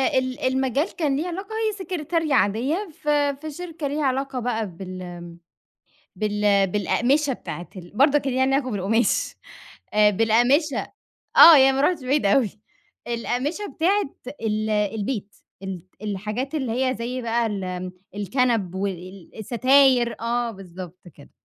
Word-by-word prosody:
ال 255 -1 0
المجال 265 - 0
كان 295 -5 0
ليه 310 +6 -2
علاقة 375 +3 -5 0.2
هي 430 - -1
سكرتارية 330 -3 -2
عادية 275 - +1
ف - - -14 0.3
في 310 0 -6
شركة 330 -1 -5
ليها 295 +2 -2
علاقة 270 0 -1
بقى 225 -3 -2
بال 175 -2 -8 0.8
بال 205 -2 +2
بالأقمشة 255 +9 +1
بتاعة 175 -6 -8
ال 175 -2 -10
برضه 280 +4 +5
كان 270 -2 -3
ليها 260 - +1
علاقة 265 0 +1
بالقماش 215 +4 0 0.6
آآ، 210 0 +6
بالأقمشة 240 - +2 0.4
آه، 330 -2 +11
يعني 270 -1 +6
ما 275 - +1
رُحتش 300 -2 +1
بعيد 275 -2 +1
أوي، 210 +2 +3 0.6
الأقمشة 255 - -2
بتاعة 370 -1 +1 0.3
ال 215 -1 -1
البيت 210 0 -2 0.3
الت 190 -3 -6 0.2
الحاجات 210 +7 -4
اللي 265 -7 -1
هي 255 +2 0
زي 250 +2 -4
بقى 235 0 0
ال 185 -3 -4 0.2
الكَنَب 205 -2 0
والستاير 225 +7 +1
آه 235 0 -1
بالضبط 185 -3 -10
كده. 145 - -16
240 Hz, 135 wpm, -23 LUFS, 205-275 Hz, 0.8 s, آه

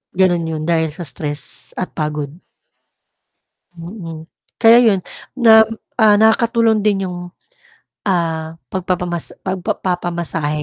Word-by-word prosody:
Gano'n 175 -3 +2
'yon, 155 -1 -3
dahil 160 -1 +1
sa 175 - -6
stress 145 0 -4
at 185 - -4
pagod. 150 -2 -3 1.4
Mm. 165 -2 -8 0.4
Kaya 230 +1 +8
'yon 200 -4 +4 0.4
nam 220 -1 +8 0.4
ah, 215 -2 +6
nakakatulong 225 0 +3
din 205 -2 +3
yung, 180 - -6 0.9
ah, 165 -4 -1 0.2
pagpapamas 180 -2 -2 0.2
pagpa 190 +2 -2
papamasahe. 170 -4 -2
175 Hz, 105 wpm, -18 LUFS, 160-205 Hz, 1.4 s, Kaya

